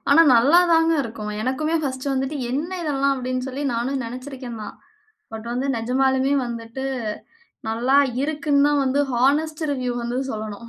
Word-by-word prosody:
ஆனா 305 +4 +8
நல்லாதாங்க 325 +6 +5
இருக்கும். 220 -3 -6
எனக்குமே 305 +6 -1
ஃபர்ஸ்ட் 260 -1 -3
வந்துட்டு 270 +3 -1
என்ன 295 +7 -2
இதெல்லாம் 275 -3 +1
அப்டின் 255 0 -3
சொல்லி 270 +2 -4
நானும் 260 +3 -1
நெனைச்சுருக்கேன் 255 -1 -7
தான். - - -8 0.6
பட் 220 +1 -7
வந்து 255 +3 -2
நிஜமாலுமே 265 +3 +1
வந்துட்டு 230 +2 -6 0.8
நல்லா 240 +5 +2 0.3
இருக்குன்னு 290 -1 +2
தான் 290 -1 +2
வந்து 270 +2 +2
ஹானஸ்ட் 300 +6 +1
ரிவ்யூ 250 -3 -2
வந்து 240 +1 -2
சொல்லணும் 215 +1 -6
265 Hz, 140 wpm, -22 LUFS, 240-285 Hz, 0.8 s, ஆனா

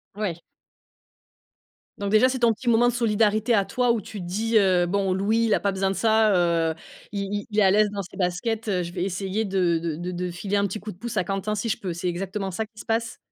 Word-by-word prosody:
Ouais. 185 -6 -3 1.6
Donc 200 0 -3
déjà 220 +4 +5
c'est 260 -1 -2
ton 235 -2 +4
petit 240 +3 -3
moment 235 +1 +4
de 245 - +1
solidarité 220 0 +2
à 200 -1 +2
toi 245 +5 +1
où 230 -2 0
tu 210 +2 -8
te 180 - -6
dis, 220 +6 -2
heu: 185 -3 +3
«Bon 195 0 0
Louis 215 +5 +1
il 215 - +2
a - - 0
pas 200 - 0
besoin 190 0 0
de 195 - -2
ça 220 -1 +3 0.4
heu, 160 - -3 0.4
il 200 -1 -2
il 205 0 -3
il 210 - -5
est - - +5
à 190 - +5
l'aise 210 0 +4
dans 200 -1 -4
ses 180 - -12
baskets, 215 +5 -1
heu, 180 -3 0
je 170 - -6
vais 180 -1 -2
essayer 195 +3 -2
de 180 -4 +1
de 165 -2 -3
de 175 +2 -5
de 180 0 -3
filer 195 +3 -2
un 200 0 +2
petit 205 +3 -5
coup 215 - -7
de 175 - -14
pouce 235 +2 -5
à 185 - +3
Quentin, 195 +3 -2
si 220 +3 -2
je - - 0
peux». 180 -3 -4
C'est 175 +2 -4
exactement 190 +2 -3
ça 220 +4 -3
qui 215 -1 -18
se - - -9
passe? 230 +1 -1
200 Hz, 265 wpm, -24 LUFS, 185-220 Hz, 1.6 s, déjà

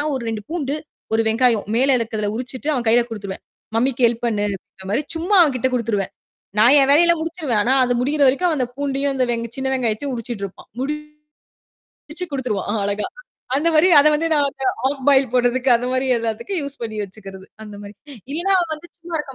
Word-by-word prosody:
ஒரு 255 - -4
2 215 -2 -4
பூண்டு, 295 -4 -2 0.4
1 225 - +3
வெங்காயம் 230 -1 +2
மேல 265 +2 +4
இருக்கிறதை 220 -2 -2
உரிச்சுட்டு 255 +3 -6
அவன் 245 -3 -2
கையில 240 +1 +5
குடுத்துருவேன். 200 -4 -7 0.3
மம்மிக்கு 250 +1 +2
ஹெல்ப் 230 +1 -3
பண்ணுன்ற 205 -4 -3
மாரி 230 +8 +1
சும்மா 355 +5 0
அவன்கிட்ட 260 -5 +1
குடுத்துருவேன். 220 -5 -1 0.5
நான் 240 +6 +7
என் 270 - +4
வேலையை 300 +4 +6
எல்லாம் 340 -1 +3
முடிச்சிருவேன். 320 -10 -1
ஆனா 250 - +2
அது 245 - 0
முடியற 285 +4 0
வரைக்கும் 345 +6 +2
அந்தப் 250 -4 -3
பூண்டியும், 280 0 0
அந்த 260 -1 +1
வென் 230 -1 -1
சின்ன 265 0 -1
வெங்காயத்தையும் 255 +2 -1
உரிச்சிட்டு 230 -3 -5
இருப்பான். 195 - -15 1.2
முடிச்சு 330 +4 -8
குடுத்துருவான் 220 -5 -2
அழகா. 205 +1 -1 0.5
அந்த 315 +4 +1
மாரி 310 +4 +5
அதை 305 - +5
வந்து 325 +2 0
நான் 290 -2 +3
அந்த 270 -1 -7 0.2
ஹாஃப் 270 -1 -1
பாயில் 270 -3 +4
போட்றதுக்கு 250 +1 +2
அது 245 +1 -4
மாரி 260 +1 0
எல்லாத்துக்கும் 230 - -3
யூஸ் 280 0 -7
பண்ணி 220 -2 -4
வச்சுக்கிறது. 195 -1 -12 0.2
அந்த 210 -1 -10
மாரி. 205 0 -10 0.4
இல்லைனா 345 +7 0
அவன் 335 -3 -2
வந்து 315 +3 -13
சும்மா 340 -1 -5
இருக்க 275 -2 -9
255 Hz, 185 wpm, -20 LUFS, 225-285 Hz, 1.2 s, நான்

